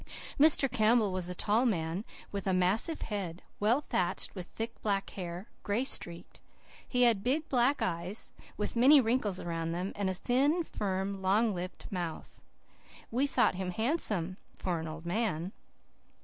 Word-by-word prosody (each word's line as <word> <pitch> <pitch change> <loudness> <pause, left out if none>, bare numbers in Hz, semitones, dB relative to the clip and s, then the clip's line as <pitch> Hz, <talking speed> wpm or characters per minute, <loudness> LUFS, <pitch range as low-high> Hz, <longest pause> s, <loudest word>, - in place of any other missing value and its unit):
Mr. 295 -2 +7
Campbell 220 -4 +3
was 180 -1 -2
a 180 - -4
tall 215 +6 +2
man, 175 -5 0 0.3
with 200 -1 -4
a 190 - +2
massive 200 - +1
head, 190 -5 -4 0.2
well 230 +7 +3
thatched 180 -10 -1
with 180 -3 -7
thick, 230 +1 -6
black 200 -2 -1
hair, 180 +2 -6
gray 210 +5 0
streaked. 175 -9 -2 0.5
He 250 -1 +2
had 225 -5 +4
big, 290 +6 +1
black 260 +2 +2
eyes, 175 +5 -3 0.2
with 210 - -2
many 270 +5 +7
wrinkles 225 -6 0
around 165 -1 -3
them, 180 +3 -3
and 200 -2 -1
a 185 - -2
thin, 280 - +2
firm, 195 -6 -3
long 205 +4 +2
lipped 180 0 -6
mouth. 175 -4 -5 0.7
We 260 +5 +2
thought - - +3
him 185 0 -3
handsome, 210 - -1 0.2
for 175 -3 -2
an 160 - -5
old 160 +1 -8
man. 180 -2 -1
200 Hz, 160 wpm, -31 LUFS, 180-240 Hz, 0.7 s, Mr